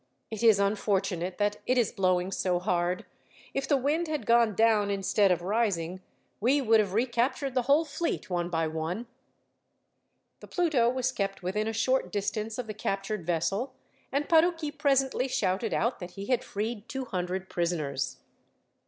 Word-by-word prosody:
It 220 - -5
is 225 -3 +6
unfortunate 195 -3 0
that 205 0 +1
it 255 - +2
is 240 -4 +2
blowing 185 -3 +1
so 180 -2 0
hard. 180 -1 -1 0.5
If 275 0 -2
the 285 - +3
wind 300 +6 0
had 305 -1 -3
gone 230 -3 +4
down 220 -2 +3
instead 200 0 +2
of 175 -1 0
rising, 185 -4 0 0.4
we 255 +7 +3
would 225 -4 +4
have 200 -3 0
recaptured 245 +3 0
the 255 - +2
whole 285 +6 +3
fleet, 310 -6 -3
one 175 -2 -1
by 165 -2 0
one." 160 +8 -3 1.3
The - - -12
Pluto 310 -10 +2
was 260 +1 0
kept 195 -5 -3
within 210 +4 -1
a - - 0
short 255 +4 +1
distance 215 +1 -2
of 250 - -3
the 215 - -5
captured 195 -3 -3
vessel, 195 +10 -1 0.4
and 280 +2 0
Parucchi 325 -2 +3
presently 270 -3 +1
shouted 205 -2 0
out 235 +5 0
that 180 -1 -8
he 195 - -5
had 250 +1 +1
freed 210 +1 -4
two 265 -1 -4
hundred 185 -2 -3
prisoners. 155 -7 -2
215 Hz, 165 wpm, -28 LUFS, 185-255 Hz, 1.3 s, is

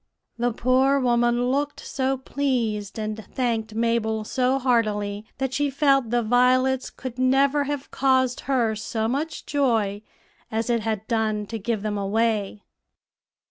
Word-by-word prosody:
'" - - -53
The 240 +1 +1
poor 260 +4 +2
woman 240 0 +2
looked 290 +2 -1
so 270 0 -1
pleased, 240 -7 -2
and 215 0 -4
thanked 225 -1 -2
Mabel 225 -1 0
so 255 +4 +1
heartily, 215 -5 0
that 265 -1 -2
she 290 +1 +1
felt 275 -3 +2
the 240 0 +1
violets 255 +3 +3
could 255 -1 -8
never 275 +3 +3
have 285 -1 -4
caused 260 -2 +2
her 235 -5 +2
so 220 +1 -2
much 285 +7 -3
joy 225 -8 0 0.5
as 225 +2 -1
it 235 - +2
had 220 -1 -3
done 220 -3 0
to 225 +2 -5
give 215 0 -2
them 210 -1 -2
away. 210 0 0
240 Hz, 145 wpm, -24 LUFS, 220-265 Hz, 0.5 s, violets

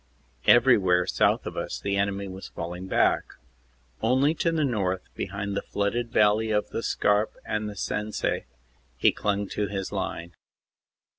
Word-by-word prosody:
Everywhere 100 -8 +5
south 90 - +2
of - - -5
us - - -4
the 100 0 -1
enemy 100 0 -1
was 95 0 -8
falling 90 +3 -6
back. - - +1 0.7
Only 130 +6 +3
to 165 +1 0
the 155 -2 +1
north, 95 -7 -1
behind 100 +1 -4
the - - 0
flooded 115 +4 -2
valley 105 +1 +3
of 105 -1 0
the - - -3
Scarpe 105 -1 +1
and 105 0 -2
the 105 - -8
Sensee, 105 +2 -2 0.5
he - - +4
clung 100 0 -1
to 105 - -1
his 95 -1 -4
line. 85 +1 -4
100 Hz, 150 wpm, -26 LUFS, 95-110 Hz, 0.7 s, Everywhere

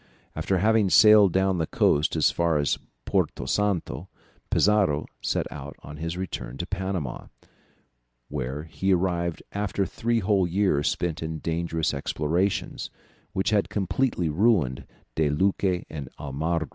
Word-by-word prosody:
After 95 - 0
having 110 +1 +3
sailed 105 -2 +7
down 95 0 +2
the 80 - 0
coast 75 +3 +2
as 80 - +3
far 85 -2 +1
as 75 -1 +1 0.3
Porto - - 0
Santo, 95 -3 -1 0.4
Pizarro 100 -8 +3 0.2
set - - 0
out 70 0 -8
on 75 0 -9
his 85 +2 -4
return 90 -8 -5
to 85 - -3
Panama, 95 -8 -4 1.0
where 70 0 -4
he 95 +4 +1
arrived 85 -2 -1
after 100 -1 -1
three 115 +4 -1
whole 100 -3 +2
years 90 -5 +1
spent 85 -2 -2
in 80 0 -3
dangerous 80 0 -1
explorations, 80 +7 -1 0.4
which 95 +3 0
had 105 -2 +2
completely 100 -1 0
ruined 80 - +2 0.3
De 80 -2 +1
Luque 95 +3 +1
and 70 -4 -7
Almagro. 75 +2 -2
85 Hz, 135 wpm, -26 LUFS, 75-100 Hz, 1.0 s, sailed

